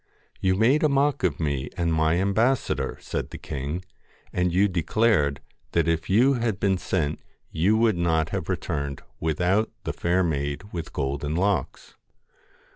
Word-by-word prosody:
'You 95 0 +2
made 125 - +3
a 155 - +4
mock 140 0 +2
of 90 -6 0
me 70 -3 -1
and 85 -2 +1
my 80 +1 +2
ambassador,' 110 +8 +1
said - - -4
the - - -8
king, 75 +7 -5 0.5
'and 90 -1 +1
you 95 +4 +4
declared 85 - +1 0.3
that 85 0 +2
if 80 -1 0
you 120 +8 +5
had 115 -6 -1
been 95 -3 +1
sent 80 -5 -1 0.3
you 95 +7 +2
would 110 -5 +2
not 80 -2 +1
have - - -4
returned 70 -1 -3 0.2
without 90 +7 +1
the - - -3
fair 90 +2 +1
maid 70 -1 -2
with 85 -2 -5
golden 70 +2 -2
locks.' 100 +3 -1
90 Hz, 155 wpm, -25 LUFS, 80-105 Hz, 0.5 s, you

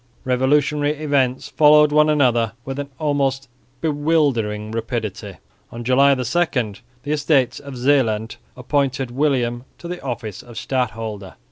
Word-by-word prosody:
Revolutionary 145 +3 +1
events 140 -4 0
followed 150 0 +5
one 150 +1 +4
another 120 -7 +2
with 135 +1 -5 0.2
almost 135 -2 0 0.3
bewildering 145 -9 0
rapidity. 110 -3 -4 0.4
On 120 0 -7
July 135 +3 +4
2 130 - -3 0.8
the 145 - -4
Estates 145 -4 +1
of 140 -2 -9
Zeeland 120 -4 +1 0.2
appointed 135 -1 -1
William 125 -3 0
to 170 - -9
the 180 0 -6
office 115 -6 -5
of 120 -2 -13
Stadholder. 110 -6 -3
130 Hz, 120 wpm, -21 LUFS, 120-145 Hz, 0.8 s, followed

